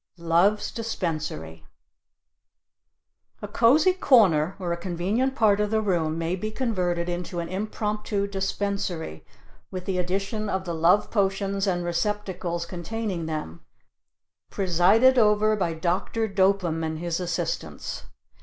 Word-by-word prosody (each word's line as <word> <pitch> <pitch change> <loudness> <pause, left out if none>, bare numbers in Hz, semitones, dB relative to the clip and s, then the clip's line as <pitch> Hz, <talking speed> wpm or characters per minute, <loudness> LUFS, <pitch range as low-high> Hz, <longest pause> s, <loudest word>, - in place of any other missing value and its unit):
LOVE'S 170 +5 +2
DISPENSARY 155 - -4 1.8
A - - -3
cozy 275 - +4
corner 195 - +4
or 180 -3 -2
a - - 0
convenient 190 +9 -1
part 210 -5 +3
of 210 0 +1
the 220 +1 +1
room 170 -7 0
may 165 +2 -1
be 215 +4 -4
converted 180 -8 -1
into 175 0 -4
an 170 - -3
impromptu 210 +1 -2
dispensary 195 - -3 0.5
with 185 -1 -6
the 185 -2 -1
addition 195 +4 -2
of 190 -1 -2
the 170 - -3
Love 170 +5 +3
potions 195 -1 0
and 175 -2 0
receptacles 175 -1 -2
containing 180 0 -4
them, 155 - -5 0.9
presided 195 +8 +4
over 215 0 +4
by 175 -5 -1
Dr. 185 +7 -1
Dopem 190 -4 +1
and 160 0 -2
his 170 +1 -2
assistants. 180 - -4
190 Hz, 125 wpm, -25 LUFS, 170-210 Hz, 1.8 s, cozy